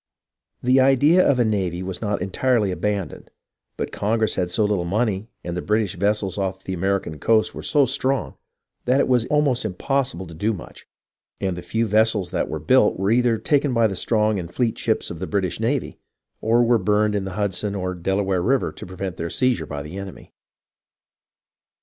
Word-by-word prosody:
The 130 +2 +4
idea 140 +7 +5
of 140 - +3
a 120 - +3
navy 95 -5 -1
was 95 -1 -5
not 105 -4 -1
entirely 105 +1 +1
abandoned, 100 -1 -3 0.5
but - - -3
Congress 110 +1 0
had 90 -1 -1
so 105 +4 +1
little 105 -4 0
money 105 +3 -1
and 85 0 -4
the 90 - -2
British 105 0 0
vessels 100 0 0
off 95 0 -3
the 95 - -4
American 95 -4 -1
coast 110 -1 +2
were - - -7
so 145 -3 +3
strong 130 +1 -1 0.5
that 130 +3 +3
it - - +2
was 125 -2 +2
almost 145 -4 +2
impossible 110 -1 -1
to 85 - -11
do 105 +8 -1
much, 90 - -11 0.5
and 95 -2 -1
the 90 - -6
few 115 +5 -1
vessels 110 -3 +2
that - - -1
were 80 - -3
built 105 - +3
were 95 +3 0
either 120 -1 +3
taken 140 +1 +1
by 115 -1 +4
the 100 -3 0
strong 105 +1 +1
and 85 -1 -7
fleet 120 -3 0
ships 110 - -1
of 85 - -7
the 95 - -4
British 95 -3 -1
navy 120 +4 -1 0.4
or 115 +2 +3
were 120 -1 +3
burned 105 +2 +2
in 100 -2 -1
the 95 - -5
Hudson 100 0 -1
or 90 -1 -2
the 90 - -11
Delaware 95 0 0
River 130 +8 +1
to - - -10
prevent 95 -1 -5
their 85 - -3
seiz 125 +2 +1
ure 80 - -6
by 75 -1 -5
the 80 +6 -8
enemy. 100 -2 -10
105 Hz, 200 wpm, -22 LUFS, 95-120 Hz, 0.5 s, idea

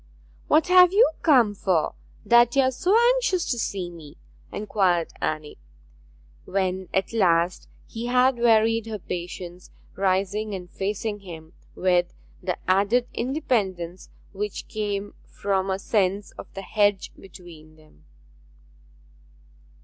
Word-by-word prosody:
'What 310 +1 +4
have 360 -1 +7
you 415 -1 +5
come 250 -10 +4
for, 185 -5 0 0.3
that 235 +3 +5
you 275 - +5
are 260 - +2
so 370 - +2 0.2
anxious 430 -8 0
to 240 - -1
see 185 -5 -3
me?' 155 -4 -13 0.3
inquired 190 -5 0
Anne, 155 -1 -3 0.9
when 190 -1 -2
at 190 +4 -1
last 175 -4 +1 0.2
he 230 +1 -6
had 250 0 +3
wearied 225 -1 +3
her 220 -1 -4
patience, 180 -1 -7 0.3
rising 195 +2 0
and 180 -2 -9
facing 205 +2 -3
him 165 -5 -11 0.2
with 180 -1 +1 0.3
the 180 -1 -2
added 205 +6 +2
independence 200 - -2 0.2
which 210 +1 -5
came 205 -1 -3
from 195 -1 -2
a 190 - 0
sense 200 0 -1
of - - -12
the 195 - -6
hedge 205 -1 +1
between 170 -4 -14
them. 155 - -23
195 Hz, 125 wpm, -24 LUFS, 180-230 Hz, 0.9 s, have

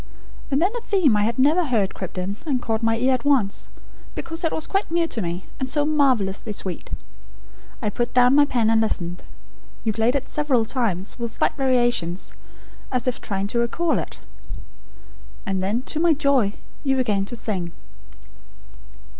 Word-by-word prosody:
And 275 -1 +2
then 365 +5 +2
a 480 - -3
theme 370 - +3
I 210 - +3
had 225 +2 0
never 300 +7 +4
heard 225 - +1
crept 185 -1 -7
in, 190 +3 -3
and 275 -5 0
caught 225 -2 -1
my 225 0 +2
ear 255 +3 +3
at 250 -2 -1
once, 260 -9 +1 0.5
because 325 +1 -4
it 325 - +1
was 315 - -2
quite 390 +1 -1
new 335 0 +2
to 240 -8 -2
me, 175 0 -3
and 265 - -2
so 295 +2 +2
marvellously 250 -9 +1
sweet. 185 -3 -5 0.9
I 210 - 0
put 240 +3 -1
down 250 +1 +5
my 290 +1 +6
pen 230 -5 +2
and 225 0 +4
listened. 180 -5 -2 0.6
You 220 - 0
played 225 +4 +2
it 275 - -1
several 275 -6 +1
times, 220 -5 -1
with 235 0 -2
slight - - +1
variations, 240 - +1 0.6
as 250 -1 -1
if 250 - -1
trying 195 -1 -2
to 235 - 0
recall 315 +8 +1
it. - - -6 1.3
And 195 -3 -1
then, 210 +6 0
to 305 - -3
my 335 0 +5
joy, 275 -8 +2 0.3
you 270 -2 +2
began 215 -7 +1
to 240 - -5
sing. 185 -7 -3
240 Hz, 180 wpm, -23 LUFS, 205-280 Hz, 1.3 s, my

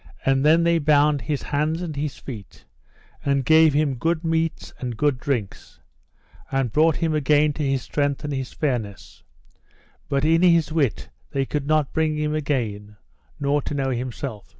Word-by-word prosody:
And 135 0 +2
then 160 +3 +5
they 170 0 +3
bound 145 -1 +3
his 145 +4 -3
hands 155 +4 -1
and 160 -4 -5
his 145 0 -3
feet, 110 -8 -10 0.6
and 140 -2 0
gave 160 -2 +5
him 150 -2 +2
good 165 +6 -1
meats 165 0 -1
and 120 -3 -5
good 145 -2 +1
drinks, 125 -9 -4 0.7
and 135 -4 0
brought 160 +3 +3
him 165 -2 -1
again 150 0 +3
to 150 - -4
his 135 -2 0
strength 145 0 -1
and 150 -1 -3
his 135 -2 -4
fairness; 120 -9 -4 0.9
but 140 +1 +1
in 165 +1 +3
his 170 -3 +4
wit 145 - -1 0.2
they 135 -1 -1
could 145 0 -3
not 155 -2 +1
bring 155 -1 0
him 150 0 -1
again, 115 -9 -2 0.4
nor 145 0 +1
to 145 - -5
know 135 -1 -1
himself. 125 -3 -5
145 Hz, 170 wpm, -23 LUFS, 135-155 Hz, 0.9 s, then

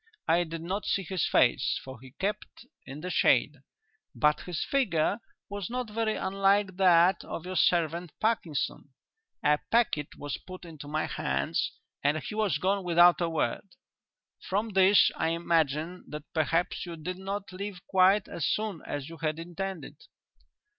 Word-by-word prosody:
I 170 +2 +3
did 165 0 -6
not 195 +4 -3
see 195 - +1
his 185 -2 -1
face - - +3
for 130 -3 -10
he 130 - -12
kept 210 +3 -4 0.2
in 135 +3 -8
the 180 +2 -4
shade, - - +3 0.6
but 150 0 +3
his 180 -3 -3
figure 225 - +1 0.3
was 200 -3 -5
not 245 -2 -4
very 220 0 0
unlike 195 0 +1
that 180 -1 +5
of 165 - -6
your 185 0 -5
servant 170 -1 +2
Parkinson. 170 - -1 0.5
A 150 0 +4
packet 220 -11 +1
was 145 -1 -5
put 185 -1 -11
into 155 -3 -10
my 155 +1 -1
hands 70 +1 -1 0.3
and 145 +2 +2
he 155 - -6
was 210 -8 +1
gone 195 +4 0
without 175 0 +5
a 170 - +1
word. 160 +4 -2 0.7
From 205 +4 -1
this 195 0 +5
I 160 - +1
imagine 165 0 0
that 150 -1 -7
perhaps 165 +2 0
you 175 -2 -6
did 180 +4 -6
not 195 0 -5
leave 190 -1 -6
quite 190 +2 +4
as 165 - -2
soon 210 -6 -1
as 145 -1 -4
you 165 0 -10
had 155 -1 -2
intended. 170 -2 -6
175 Hz, 160 wpm, -29 LUFS, 155-195 Hz, 0.7 s, that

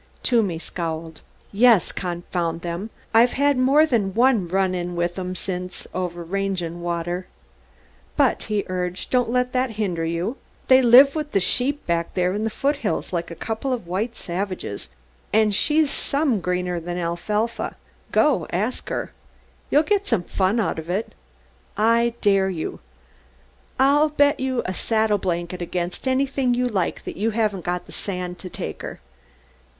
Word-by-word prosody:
Toomey 215 -9 +2
scowled. 165 -1 -5 0.3
"Yes, 225 -1 +5
confound 175 -1 -3
'em! 175 +5 -4 0.2
I've 235 +2 +5
had 285 +1 +3
more 270 +5 +5
than 205 -9 0
one 235 -6 +3
'run 190 +1 +1
in' 175 -1 -3
with 175 +1 -1
'em 185 0 -4
since 180 -1 -5
over 175 -2 -3
range 195 +1 -1
and 170 +1 -5
water. 175 +1 -3 0.9
But," - - +3
he 210 -2 +1
urged, 180 0 -4
"don't 245 -2 +2
let 250 +1 0
that 255 -2 0
hinder 180 -6 -1
you. 170 +10 -2 0.3
They 260 0 +8
live 260 +3 +8
with 300 -2 -4
their 195 - +4
sheep 255 +9 0
back 170 -1 -1
there 180 0 +1
in 210 +2 -1
the - - +1
foothills 275 -4 -1
like 170 -1 -2
a 170 - -7
couple 225 +8 -3
of 245 -7 -2
white 205 +7 -2
savages, 185 - -4 0.4
and 215 -1 +3
she's 300 +6 +3
some 280 -6 +1
greener 180 -1 -1
than 175 +1 -5
alfalfa. 210 +7 -2 0.4
Go - - +3
and - - -6
ask - - -2
her. - - -3 0.6
You'll 295 - +4
get 405 +4 +1
some 180 - +1
fun 195 +5 +1
out 205 - 0
of 160 +1 -8
it. 195 +5 -2 0.6
I 230 +2 +3
dare 195 -2 +3
you! 165 -4 -4 1.0
I'll 290 +3 +5
bet 285 -1 +3
you 260 -1 -1
a 185 - -2
saddle 220 0 +1
blanket 175 -1 -2
against 175 +6 -3
anything 260 -1 +1
you 250 +1 +1
like 200 -8 -1
that - - -7
you 215 +4 +1
haven't 210 -5 -1
got 175 0 -2
the - - -14
sand 180 -2 -4
to 185 - -8
take - - -6
her." - - -7
195 Hz, 165 wpm, -23 LUFS, 175-245 Hz, 1.0 s, They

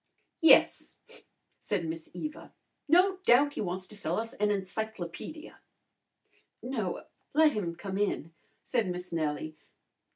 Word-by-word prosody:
"Yes," 325 - +5 0.6
said 195 -5 -2
Miss 160 0 -6
Eva. 305 0 -6 0.4
"No 365 +5 +5
doubt 285 -4 +4
he - - -3
wants 185 -1 -3
to 210 - -8
sell 175 -4 -2
an 220 -2 -1
encyclopedia." 205 - -4 1.0
"No, 230 -8 -2 0.3
let 310 0 +6
him 180 -9 -3
come 195 +2 -4
in," 165 -5 -1 0.3
said 230 -6 0
Miss 180 0 -5
Nellie. 155 -1 -2
205 Hz, 120 wpm, -30 LUFS, 175-265 Hz, 1.0 s, let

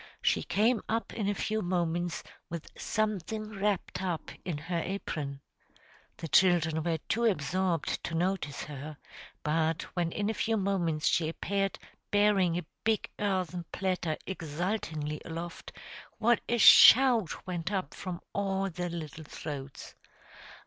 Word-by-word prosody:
She - - +3
came 220 +3 +2
up 225 +1 -1
in 205 -3 -1
a 205 - 0
few 215 +2 -1
moments 175 -1 -1 0.3
with 170 -2 -6
something 215 0 -2
wrapped 200 -2 -1
up 180 -4 -3
in 175 -5 -3
her 170 +3 -2
apron. 155 -7 -4 0.8
The 165 - -5
children 160 -1 +4
were 165 0 0
too 235 +2 +1
absorbed 185 -3 0
to 170 - -3
notice 170 -4 -1
her, 150 +1 -7 0.5
but 160 +1 +1
when 175 -2 0
in 205 +2 -1
a 220 - +1
few 225 +1 0
moments 175 -6 0
she 160 -2 +2
appeared 195 +3 -1 0.3
bearing 205 -4 +3
a 175 - -4 0.2
big 220 -1 0
earthen 185 -4 -1
platter 180 -4 -1
exultingly 160 -3 -3
aloft, 170 +1 -6 0.5
what 235 +1 +3
a 240 - +2
shout 235 -4 +7
went 180 0 -3
up 190 -7 -2
from 180 -2 -6
all 195 -1 0
the 175 +1 -3
little 160 -2 -6
throats! 140 -3 -7
180 Hz, 135 wpm, -30 LUFS, 160-200 Hz, 0.8 s, shout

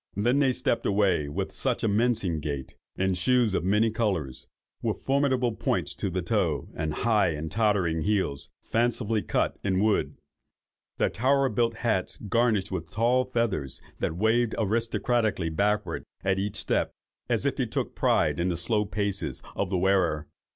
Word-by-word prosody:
Then 120 +7 +2
they 135 -2 +4
stepped 120 -1 0
away 95 -7 +2
with 75 - -3
such - - -1
a - - +3
mincing 105 -6 +1
gait, 70 -3 -4 0.2
in 95 0 +1
shoes 120 +3 +2
of 85 - 0
many 105 +4 +3
colours, 85 - -2 0.3
with - - -1
formidable 130 -3 +1
points - - -1
to 100 - -3
the 90 0 -2
toes, 85 - 0
and 80 -1 -2
high 105 +4 +2
and 80 +1 -5
tottering 100 -7 +1
heels, 95 -8 0
fancifully 115 -2 0
cut - - -1
in 95 -2 +1
wood; 105 +1 +1 0.8
their - - +1
tower 135 +3 +2
built 115 +1 +1
hats 110 -5 -1
garnished 110 -2 +1
with 85 -3 -4
tall 120 +5 +2
feathers 115 - -1 0.2
that 80 - -2
waved 110 +3 +2
aristocratically 115 -3 0
backward 100 +6 0 0.2
at 95 0 +1
each 100 +1 -2
step, 100 - 0 0.4
as - - +1
if - - +1
they - - -1
took - - -2
a - - -31
pride - - +1
in 90 +2 +1
the 85 - -1
slow 105 +5 +1
paces 100 -1 -2
of 100 - -1
the 95 - 0
wearer. 90 -5 +2
105 Hz, 165 wpm, -27 LUFS, 90-115 Hz, 0.8 s, they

